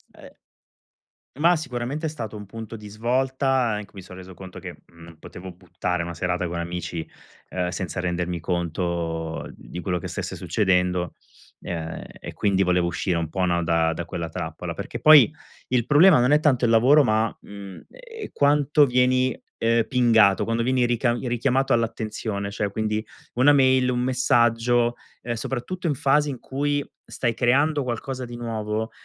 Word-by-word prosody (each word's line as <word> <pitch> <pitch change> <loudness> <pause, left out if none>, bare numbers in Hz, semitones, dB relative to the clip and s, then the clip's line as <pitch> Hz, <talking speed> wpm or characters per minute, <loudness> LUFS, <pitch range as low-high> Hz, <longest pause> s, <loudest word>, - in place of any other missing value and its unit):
Eh - - -14 1.1
Ma 170 +3 +5
sicuramente 140 +1 -3
è - - -2
stato 115 -9 -6
un 105 -1 -8
punto 115 +2 -8
di 105 -1 -10
svolta, 130 +5 -1 0.2
anche 105 -3 -4
mi 100 - -9
sono 90 0 -12
reso 95 0 -11
conto 95 0 -10
che, - - -9
mhmm, 85 0 -20
non 85 -1 -13
potevo 90 +3 -10
buttare 90 0 -3
una 85 +1 -5
serata 90 +1 -2
con 85 0 -4
amici, 85 -1 -5 0.4
ehm, 90 -1 -2
senza 90 -1 -4
rendermi 90 -1 -2
conto 85 -1 -3
di 90 - -9
quello 90 0 -2
che - - -6
stesse - - -5
succedendo, 90 -4 0 0.5
ehm, 80 -2 -5 0.2
e - - -8
quindi 95 -2 +1
volevo 90 -1 +2
uscire 90 0 -1
un 85 -2 -2
po', 95 +2 -1
no, 85 -1 +1
da 80 0 +1
da 85 - -4
quella 85 0 -5
trappola. 80 - -5
Perché, - - -6
poi, 150 -3 +7 0.4
il 125 -2 +1
problema 155 +3 +6
non 125 +3 +3
è 150 - +4
tanto 130 -5 +3
il 115 - +2
lavoro 130 +7 +6
ma, 110 0 +1
mhmm, 100 -2 -11
ehm, 470 -3 -10
quanto 145 +1 +4
vieni, 125 0 +2 0.2
ehm, 115 0 +2
pingato, 115 -6 +4
quando 115 0 -1
vieni 130 0 +2
ricam 120 0 +1
richiamato 130 +3 +1
all'attenzione, 110 -3 -2
cioè, 100 0 -2
quindi, 110 +1 -2 0.3
1 130 +4 +5
mail, 130 -2 +4
1 125 -1 0
messaggio, 120 -1 +2 0.3
ehm, 120 -1 -3
soprattutto 135 +10 -4
in 150 - +2
fasi 145 +1 +2
in 130 -3 -5
cui 145 +2 -2 0.3
stai 120 -2 -1
creando 140 +5 +2
qualcosa 125 +2 -4
di 120 -1 -7
nuovo, 110 -1 -3
115 Hz, 170 wpm, -24 LUFS, 90-130 Hz, 1.1 s, poi